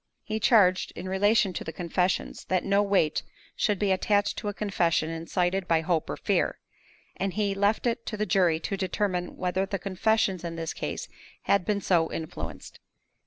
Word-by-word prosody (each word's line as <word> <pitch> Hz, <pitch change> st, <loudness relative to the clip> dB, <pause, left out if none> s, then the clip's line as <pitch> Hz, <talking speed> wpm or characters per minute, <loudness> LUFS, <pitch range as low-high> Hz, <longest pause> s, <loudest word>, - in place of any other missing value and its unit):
He 220 Hz, 0 st, -3 dB
charged, 200 Hz, -5 st, +4 dB
in 180 Hz, -, -6 dB
relation 200 Hz, +1 st, +3 dB
to -, -, -4 dB
the 160 Hz, -, -5 dB
confessions, 180 Hz, +2 st, -1 dB
that 185 Hz, -1 st, 0 dB
no 200 Hz, +1 st, +3 dB
weight 195 Hz, -7 st, +2 dB, 0.3 s
should 210 Hz, -2 st, +1 dB
be 200 Hz, 0 st, +1 dB
attached 205 Hz, +2 st, +2 dB
to -, -, -5 dB
a -, -, 0 dB
confession 170 Hz, -6 st, 0 dB
incited 175 Hz, +3 st, -1 dB
by 165 Hz, -1 st, +3 dB
hope 160 Hz, -1 st, 0 dB
or -, -, -3 dB
fear; -, -, 0 dB, 0.6 s
and 195 Hz, -1 st, -1 dB
he 205 Hz, -2 st, +1 dB
left 200 Hz, +4 st, +1 dB
it 235 Hz, 0 st, 0 dB
to 215 Hz, -, -3 dB
the 215 Hz, -, 0 dB
jury 180 Hz, -4 st, +3 dB
to 195 Hz, -, -2 dB
determine 185 Hz, -1 st, -2 dB
whether 185 Hz, +1 st, 0 dB
the 195 Hz, 0 st, -2 dB
confessions 195 Hz, 0 st, 0 dB
in 170 Hz, -1 st, -4 dB
this 165 Hz, -1 st, -4 dB
case -, -, -4 dB, 0.4 s
had 200 Hz, -3 st, +2 dB
been 205 Hz, -1 st, 0 dB
so 170 Hz, -4 st, +2 dB
influenced. 160 Hz, -1 st, -7 dB
190 Hz, 180 wpm, -27 LUFS, 175-205 Hz, 0.6 s, charged